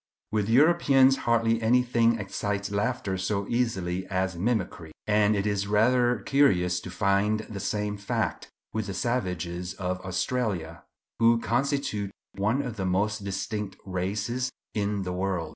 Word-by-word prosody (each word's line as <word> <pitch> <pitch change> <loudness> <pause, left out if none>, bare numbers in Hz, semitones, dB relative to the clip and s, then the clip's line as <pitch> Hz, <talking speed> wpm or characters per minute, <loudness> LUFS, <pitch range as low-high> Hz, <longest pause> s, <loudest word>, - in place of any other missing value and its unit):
With 105 -1 0
Europeans 135 -1 +5
hardly 115 -1 +3
anything 115 0 +3
excites 100 0 -3
laughter 100 -2 -1
so 100 +1 -1
easily 95 -7 -1
as 95 -1 -1
mimicry; 90 -5 -2
and 105 0 +3
it 100 0 -1
is 100 -1 0
rather 120 +3 +3
curious 90 -11 +3
to - - -8
find 100 +2 +1
the 110 -2 -8
same 105 +1 -2
fact 100 0 -2 0.2
with 110 -1 -2
the 95 - -4
savages 90 -7 -2
of 90 -1 -3
Australia, 95 -3 -2 0.4
who 115 0 +5
constitute 120 -4 -1 0.2
one 110 +8 0
of 120 -5 -5
the 95 - -2
most 100 +3 0
distinct 100 0 -3
races 100 +7 -2 0.2
in 100 -1 -1
the 90 -1 -3
world. 90 -3 -2
105 Hz, 140 wpm, -27 LUFS, 95-115 Hz, 0.4 s, Europeans